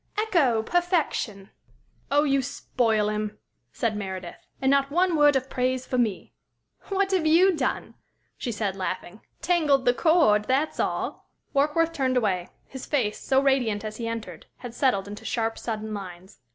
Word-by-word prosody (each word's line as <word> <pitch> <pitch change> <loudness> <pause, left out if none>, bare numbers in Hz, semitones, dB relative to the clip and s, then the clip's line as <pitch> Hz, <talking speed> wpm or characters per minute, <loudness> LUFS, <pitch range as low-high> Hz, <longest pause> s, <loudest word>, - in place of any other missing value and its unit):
Ecco! 310 - +2
Perfection!" 315 - -1 0.6
"Oh, 290 +1 +3
you 275 -2 +2
spoil 235 -5 0
him," 210 0 -3 0.3
said 230 -3 -1
Meredith, 190 -3 -5 0.3
"And 265 0 +2
not 275 0 +3
one 350 +3 +2
word 295 -2 +5
of 265 0 0
praise 255 0 -1
for 255 - -1
me!" 220 -6 -1 0.5
"What 395 0 0
have 360 -5 +2
you 350 +4 +5
done?" 265 -4 -2 0.4
she 245 - -4
said, 205 -3 -2
laughing. 185 +1 -5 0.2
"Tangled 305 -6 +2
the 245 - +5
cord 305 -10 +3
that's 270 +6 0
all!" - - -2 0.2
Warkworth 305 +4 +2
turned 260 -3 0
away. 190 -6 0 0.2
His 265 -2 -9
face, 240 -8 0
so 265 0 +2
radiant 245 -6 +1
as 215 0 -6
he 230 - -4
entered, 220 -8 -6
had 245 -2 -8
settled 220 -8 +1
into 205 +1 -8
sharp, 225 -1 -2
sudden 220 -2 -4
lines. 190 -1 -9
250 Hz, 160 wpm, -25 LUFS, 210-290 Hz, 0.6 s, word